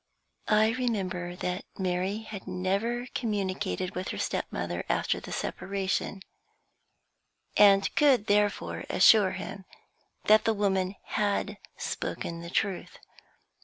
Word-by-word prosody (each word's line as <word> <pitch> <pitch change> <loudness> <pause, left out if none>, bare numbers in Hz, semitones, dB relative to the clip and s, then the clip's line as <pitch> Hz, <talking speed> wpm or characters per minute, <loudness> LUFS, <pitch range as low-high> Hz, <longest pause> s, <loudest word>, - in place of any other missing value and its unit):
I 215 +1 +4
remembered 185 -8 -2
that 180 +1 -2
Mary 190 +3 -1
had 205 -3 -8
never 200 +7 -1
communicated 195 -4 -2
with 185 +1 -4
her - - -4
stepmother - - -2
after - - +1
the - - -10
separation, 195 0 -2 1.3
and 195 -1 +6
could 270 -7 +4
therefore 205 0 +1
assure 205 -4 +6
him 190 0 -7 0.6
that 215 +1 +5
the 225 - +1
woman 190 -2 0
had 205 -1 -1 0.2
spoken 170 0 -4
the 170 - -7
truth. 190 +1 -2
195 Hz, 110 wpm, -28 LUFS, 185-215 Hz, 1.3 s, and